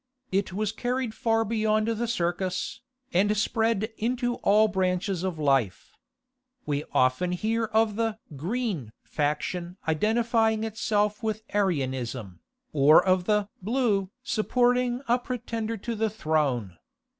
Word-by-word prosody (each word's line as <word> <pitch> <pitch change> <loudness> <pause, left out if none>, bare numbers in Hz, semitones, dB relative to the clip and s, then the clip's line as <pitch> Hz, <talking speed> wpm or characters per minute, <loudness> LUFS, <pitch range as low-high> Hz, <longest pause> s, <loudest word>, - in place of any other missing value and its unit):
It 195 0 0
was 210 +2 -1
carried 245 +1 -2
far 225 -1 +1
beyond 215 0 +1
the 230 +1 -1
circus, 185 -3 -2 0.3
and 205 +4 +3
spread 220 0 +1
into 245 +1 0
all 215 +2 +4
branches 185 -2 0
of 185 -3 -2
life. 135 -9 +1 0.7
We 145 0 -1
often 130 +8 +2
hear 225 +5 0
of 220 -1 +1
the 225 -2 0 0.2
"Green" 175 - -3
faction 170 +4 -2
identifying 220 +5 +2
itself 210 0 0
with 220 -1 -2
Arianism, 130 - -1 0.3
or 150 +3 +6
of 185 -1 +2
the 210 -1 +2
"Blue" 210 -3 +1
supporting 245 +2 +1
a 240 +2 +3
pretender 230 -2 -4
to 235 +4 -4
the 220 0 0
throne. 145 - -1
210 Hz, 120 wpm, -27 LUFS, 175-225 Hz, 0.7 s, or